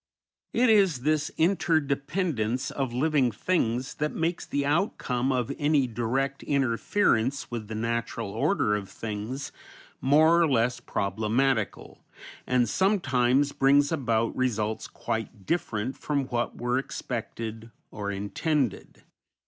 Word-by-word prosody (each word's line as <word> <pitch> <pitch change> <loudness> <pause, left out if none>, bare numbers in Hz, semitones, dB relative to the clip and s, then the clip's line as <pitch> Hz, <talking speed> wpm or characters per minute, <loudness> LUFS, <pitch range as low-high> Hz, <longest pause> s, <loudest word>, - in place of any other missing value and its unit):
It 250 +2 +3
is 190 - +4
this 155 +3 +1
inter 165 -1 +3
dependence 140 - -1
of 135 -3 -2
living 135 0 +2
things 125 - -1
that 150 +1 -2
makes 170 +1 -1
the 140 0 -1
outcome 140 - 0
of 125 -3 -1
any 145 -2 +3
direct 125 +4 -2
interference 135 - +1
with 115 -3 -4
the 110 - -5
natural 115 -1 -2
order 105 - +1
of 100 -2 -5
things 110 +5 -5 0.5
more 160 +5 +5
or 165 - +4
less 125 -3 +1
problematical, 110 +3 -1 0.4
and 125 -2 +3
sometimes 140 - +2
brings 140 +2 +4
about 115 -7 0
results 110 -4 -1
quite 110 -2 -5
different 130 -8 -1
from 140 -2 -1
what 120 -1 -2
were 120 +2 +1
expected 115 -3 -5 0.2
or 105 -2 -4
intended. 110 - -2
130 Hz, 120 wpm, -27 LUFS, 115-150 Hz, 0.5 s, more